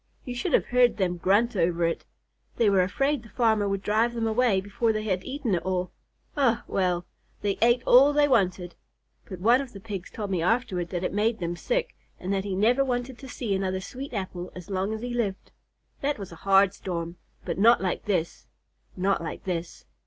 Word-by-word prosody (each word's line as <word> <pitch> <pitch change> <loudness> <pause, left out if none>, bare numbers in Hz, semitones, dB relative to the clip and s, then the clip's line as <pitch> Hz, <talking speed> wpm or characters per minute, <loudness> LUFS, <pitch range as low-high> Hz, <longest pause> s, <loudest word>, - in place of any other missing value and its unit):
You 250 - -4
should 240 - -3
have - - +4
heard 245 -1 +3
them 180 -3 0
grunt 205 +7 +2
over 170 -2 +1
it. 165 - -2 0.5
They 220 -3 +4
were 195 -2 +4
afraid 275 +9 0
the 225 - -15
farmer 220 -2 +2
would 195 0 -2
drive 225 +3 +1
them 230 -1 -1
away 225 -2 +2
before 205 +4 0
they 215 -1 -2
had 185 -4 -1
eaten 260 -6 -2
it 175 - +1
all. 185 -1 -2 0.4
Eh, 260 -6 +3
well! 180 -2 0 0.4
They 200 -1 -1
ate 240 +1 +4
all 270 +4 +7
they 290 0 +4
wanted, 185 -8 +1 0.6
but 185 - -7
one 235 +7 +4
of 270 -3 -8
the 200 - -9
Pigs 195 -3 -6
told 210 -4 -5
me 180 -3 0
afterward 185 -3 0
that 180 -1 -3
it - - -2
made 215 +2 +1
them 175 -1 -3
sick, - - -2 0.2
and 185 +2 -2
that 195 0 -1
he 195 -2 -2
never 240 +7 +3
wanted 245 -1 -3
to 265 - -10
see 230 -5 -3
another 190 -1 -1
sweet 260 +8 -7
apple 185 -4 -5
as 180 +1 -9
long 190 +2 -1
as 220 0 -4
he 245 0 -4
lived. 210 -6 -2 0.5
That 285 +1 0
was 195 -4 -8
a - - -9
hard 195 0 +6
storm, 170 -3 -5 0.3
but 170 0 -3
not 230 +3 +6
like 185 -2 -2
this, 175 -5 -2 0.5
not 190 +1 +1
like 165 - -6
this." 175 -2 -4
200 Hz, 210 wpm, -26 LUFS, 185-240 Hz, 0.6 s, all